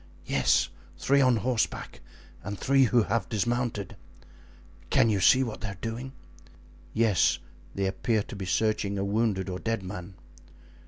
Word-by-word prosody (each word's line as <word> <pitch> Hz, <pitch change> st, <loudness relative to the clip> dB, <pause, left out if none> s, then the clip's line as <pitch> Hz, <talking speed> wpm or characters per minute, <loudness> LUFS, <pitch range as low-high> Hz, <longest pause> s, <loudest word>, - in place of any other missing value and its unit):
"Yes, -, -, +2 dB, 0.3 s
three 140 Hz, +1 st, +3 dB
on 130 Hz, -2 st, +4 dB
horseback 115 Hz, +1 st, -2 dB, 0.4 s
and 100 Hz, +3 st, -5 dB
three 135 Hz, +3 st, +4 dB
who 120 Hz, -1 st, +3 dB
have 105 Hz, -2 st, -1 dB
dismounted." 115 Hz, -2 st, -1 dB, 0.9 s
"Can 115 Hz, -, +4 dB
you 100 Hz, -, +1 dB
see 130 Hz, +8 st, +5 dB
what 115 Hz, -5 st, -5 dB
they 105 Hz, -, -3 dB
are 95 Hz, -2 st, -7 dB
doing?" 120 Hz, +4 st, -5 dB, 0.8 s
"Yes, 110 Hz, -6 st, +3 dB, 0.4 s
they 100 Hz, -, 0 dB
appear 105 Hz, +3 st, 0 dB
to -, -, -10 dB
be 95 Hz, -2 st, -5 dB
searching 100 Hz, +1 st, 0 dB
a 100 Hz, -, -1 dB
wounded 100 Hz, -2 st, 0 dB
or 90 Hz, -1 st, -4 dB
dead 115 Hz, -3 st, -2 dB
man." 90 Hz, 0 st, -7 dB
110 Hz, 150 wpm, -28 LUFS, 100-120 Hz, 0.9 s, see